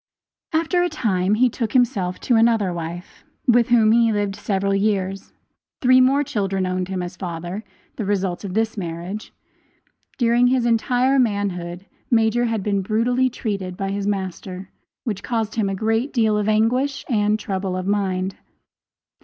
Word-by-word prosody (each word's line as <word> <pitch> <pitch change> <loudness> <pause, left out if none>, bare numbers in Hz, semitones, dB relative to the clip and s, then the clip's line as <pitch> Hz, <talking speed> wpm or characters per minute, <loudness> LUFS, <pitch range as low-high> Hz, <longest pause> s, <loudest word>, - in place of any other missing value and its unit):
After 330 +2 +1
a 355 - +1
time 205 - +1
he 250 +3 +4
took 230 -1 -2
to - - -13
himself 195 -7 +1
another 225 -5 +3
wife, 170 +1 -7 0.2
with 240 0 +4
whom 225 -3 +5
he 230 0 +4
lived 205 -2 -1
several 195 -1 -1
years. 195 -1 -1 0.5
Three 255 0 +5
more 275 +3 +4
children 195 -6 -1
owned 185 0 -2
him 185 -1 -3
as 175 +1 -6
father 175 +2 -5 0.3
the 225 - -2
result 190 -2 -1
of 195 -2 -5
this 225 0 0
marriage. 180 +2 -5 0.9
During 240 0 +3
his 250 -1 +2
entire 250 +3 +2
manhood 195 -6 -1 0.2
Major 235 0 +3
had 225 -4 -1
been 200 -1 0
brutally 240 +6 +1
treated 195 -6 -4
by 195 0 -2
his 200 0 -2
master, 190 -1 -4 0.3
which 205 -5 -3
caused 225 -3 -2
him 215 -3 0
a 195 - -2
great 225 +6 0
deal 220 -3 +2
of 210 0 0
anguish 250 +6 +1
and 210 -3 +2
trouble 190 -3 -3
of 185 - -4
mind. 190 -2 -1
210 Hz, 160 wpm, -22 LUFS, 190-235 Hz, 0.9 s, whom